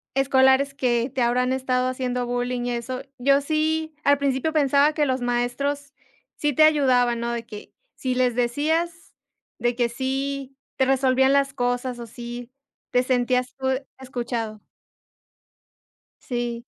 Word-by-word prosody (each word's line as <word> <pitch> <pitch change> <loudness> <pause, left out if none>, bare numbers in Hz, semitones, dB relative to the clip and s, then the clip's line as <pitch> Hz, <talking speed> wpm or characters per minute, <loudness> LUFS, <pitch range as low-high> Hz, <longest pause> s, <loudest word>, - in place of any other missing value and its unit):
escolares 270 0 +4
que 245 -2 0
te 265 - -1
habrán 250 +2 +2
estado 255 -1 0
haciendo 250 -1 -2
bullying 245 0 -2
y 245 - -1
eso, 240 +2 -4 0.2
yo 275 +2 +4
sí 315 +1 -1
al 285 0 +4
principio 280 +2 0
pensaba 285 0 +4
que 300 -1 +1
los 260 -2 -1
maestros 260 +4 -1 0.4
sí 295 -1 0
te 310 - +5
ayudaban, 255 -6 +4
¿no?, 235 - -2
de 235 -1 -4
que, 210 -2 -11 0.2
si 255 -1 -2
les 250 -2 +2
decías 320 +8 -1 0.5
de 240 +1 0
que 240 -1 +2
sí 270 +2 -3 0.2
te 265 - +3
resolvían 265 0 +3
las 275 -1 +2
cosas, 245 -1 -1
o 235 - -7
sí 240 +1 -8 0.4
te 250 - +3
sentías 250 0 +1
tú 265 0 -3 0.3
escuchado. 235 -4 -4 1.6
Sí. 240 -1 -3
255 Hz, 145 wpm, -24 LUFS, 245-275 Hz, 1.6 s, te